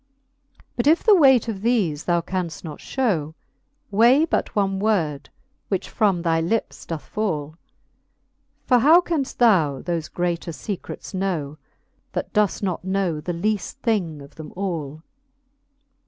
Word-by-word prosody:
But 240 - 0
if 320 +3 +4
the 435 - +6
weight 265 - +5
of 220 -3 -3
thefe 195 -9 0
thou 170 -1 +2
canft 175 -2 -4
not 155 -4 -7
fliow. 170 - -1 0.6
Weigh 240 +9 +5
but - - -2
one 195 -2 +1
word, 165 -10 0 0.4
which 195 - -3
from 195 -6 +1
thy 165 -1 +2
lips 200 +8 -2
doth 165 -3 -4
fall. 155 -8 -3 1.1
For 250 -2 +4
how 315 +8 +7
canft 325 -6 -2
thou 170 - +4
thofe 170 -2 -3
greater 175 -1 -2
fecrets 200 +4 -6
know. 165 -6 -2 0.5
That - - -4
doeft 210 -1 +1
not 185 -3 -2
know 190 -4 -1
the 175 - -3
leaft 205 +4 -1
thing 175 - -1
of 140 - -15
them 155 -1 -10
all 160 -6 -4
185 Hz, 140 wpm, -23 LUFS, 160-220 Hz, 1.1 s, how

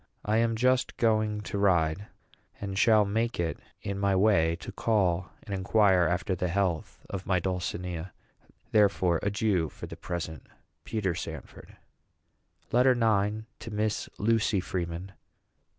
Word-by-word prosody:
I 110 +1 +2
am 115 0 +2
just 125 +2 +1
going 110 -2 +1
to 100 -1 -4
ride, 95 0 +2 0.5
and 100 -1 -4
shall 105 +1 +5
make 115 +3 -1
it 85 -1 -1 0.2
in 100 0 -3
my 100 -1 +2
way 95 -5 +3
to - - -8
call 95 -5 +1
and 100 - -6
inquire 95 -2 +3
after 90 +2 -1
the 90 0 -1
health 90 -2 -2
of 95 -2 -6
my 95 -1 +2
dulcinea. 90 -1 -3 0.6
Therefore, 95 -5 +3
adieu 100 -5 +1
for - - -9
the - - -8
present. 80 -3 -5 0.4
PETER 100 -5 -1
SANFORD. 85 - -8 0.9
LETTER 125 +2 +5
IX. 110 -2 +1
TO 115 - -8
MISS 105 0 -1
LUCY 110 -2 +2
FREEMAN. 90 0 -4
100 Hz, 135 wpm, -28 LUFS, 90-110 Hz, 0.9 s, shall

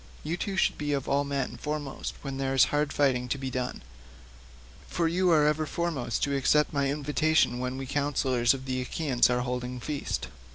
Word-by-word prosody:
You 160 +3 -2
two 195 +2 -3
should - - +2
be 145 -1 -1
of 140 -2 -2
all 140 +1 +2
men 140 -2 -3
foremost 150 -2 -4
when 135 -2 -4
there 135 0 -1
is 135 - +7
hard 145 0 +1
fighting 130 -3 +1
to 130 - -1
be 135 -1 -4
done, 125 - -3 1.0
for 170 -1 0
you 180 +2 +2
are 155 -3 +5
ever 150 +1 +1
foremost 145 -10 -2
to 140 -1 +1
accept 150 +3 +3
my 140 -1 +1
invitation 150 -2 +1
when 125 +1 -3
we 135 - -4
councillors 135 -3 +1
of 130 0 -8
the 130 -1 -2
Achaeans 130 -2 +1
are 125 0 +1
holding 125 0 -3
feast. 145 +3 -3
140 Hz, 195 wpm, -28 LUFS, 130-150 Hz, 1.0 s, is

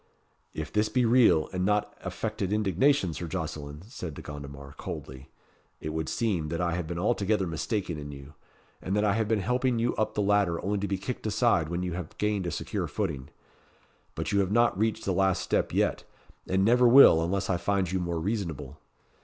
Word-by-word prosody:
"If - - -5
this 105 +1 +2
be 125 +3 +2
real, 115 -9 +5
and 90 0 -1
not 105 +2 +1
affected 95 - -3
indignation, 105 - +2
Sir 85 - -5
Jocelyn," 80 -3 -5
said 90 - -7
De - - -9
Gondomar 70 -1 -9
coldly, 65 -1 -8 0.5
"it 75 - -5
would 80 0 -3
seem 95 -10 -1
that 85 +1 -3
I 85 -1 0
have 85 -2 -3
been 85 +1 -4
altogether 105 0 +1
mistaken 85 0 -3
in 75 0 -7
you, 70 +1 -11 0.5
and 95 - -2
that 105 - +2
I 100 - +3
have 110 0 0
been 110 -2 +1
helping 125 +3 +1
you 115 +1 0
up 110 - -1
the 105 - +1
ladder 100 -4 +2
only 100 +1 0
to 100 - -2
be 95 0 -1
kicked 115 +3 -5
aside 105 -7 +2
when 85 +1 -2
you 90 -1 -3
have 90 -3 -7
gained 105 -3 0
a - - -2
secure - - -3
footing. 65 0 -3 0.9
But - - -3
you 100 - +2
have 95 -1 +1
not 120 +2 +3
reached 110 +2 -1
the 95 - 0
last 95 0 +2
step - - 0
yet, - - 0 0.4
and 95 +1 +2
never 120 +2 +5
will, 120 -10 +8
unless 100 +3 -1
I 90 - +1
find 95 -1 0
you 95 - 0
more 85 -2 -2
reasonable. 80 - -4
95 Hz, 205 wpm, -28 LUFS, 80-105 Hz, 0.9 s, will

